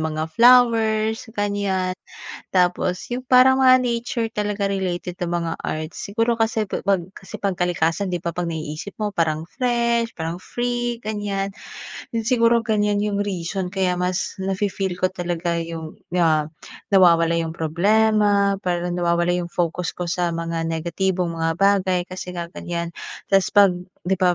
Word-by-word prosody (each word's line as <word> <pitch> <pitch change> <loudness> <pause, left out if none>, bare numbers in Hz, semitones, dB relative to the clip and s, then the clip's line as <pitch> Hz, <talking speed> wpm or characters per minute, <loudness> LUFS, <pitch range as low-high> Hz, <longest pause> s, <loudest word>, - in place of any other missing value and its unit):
mga 160 0 -3
flowers, 225 -1 +4
ganyan. 200 -3 0 0.6
Tapos 180 0 +1
yung 250 +1 -4
parang 255 +1 +6
mga 255 -1 +6
nature 235 -1 -2
talaga 205 -2 -1
related 180 -2 -3
na 175 - -2
mga 170 -1 -2
art. 155 0 -4
Siguro 230 +6 -1
kasi 225 -2 0
pa - - -1
'pag 195 -3 +3
kasi 195 0 -14
'pag 195 -3 -1
kalikasan, 175 +2 0
'di 175 -2 -3
ba 170 - -1
'pag 175 +1 -3
naiisip 160 +3 -5
mo 210 -1 -2
parang 160 -4 0 0.2
fresh, 235 -2 +1
parang 165 +1 -4
free, 240 +3 -3
ganyan. 205 -2 -2 0.6
Yun 225 -1 -3
siguro, 230 -1 +3
ganyan 210 -2 +1
yung 205 -1 0
reason 185 -1 -3
kaya 190 -2 0
mas 180 +1 -2
nafe-feel 195 -1 -2
ko 185 - +3
talaga 175 -1 -2
yung, 165 -1 -7 0.2
ah, 155 -2 +2 0.4
nawawala 170 -4 +5
yung 165 -1 -3
problema, 200 +4 +2
parang 175 -2 -2
nawawala 175 0 +1
yung 175 - -3
focus 175 0 -2
ko 175 -1 -4
sa 175 -1 0
mga 165 0 -3
negatibong 170 +2 -1
mga 165 0 -1
bagay, 190 -1 +2
kasi 180 0 -6
nga 170 -1 -5
ganyan. 170 -1 -4 0.4
Tapos 195 -2 +2
'pag 200 -2 +7 0.3
'di 190 +1 0
ba 180 -1 +3
185 Hz, 155 wpm, -22 LUFS, 170-210 Hz, 0.6 s, pag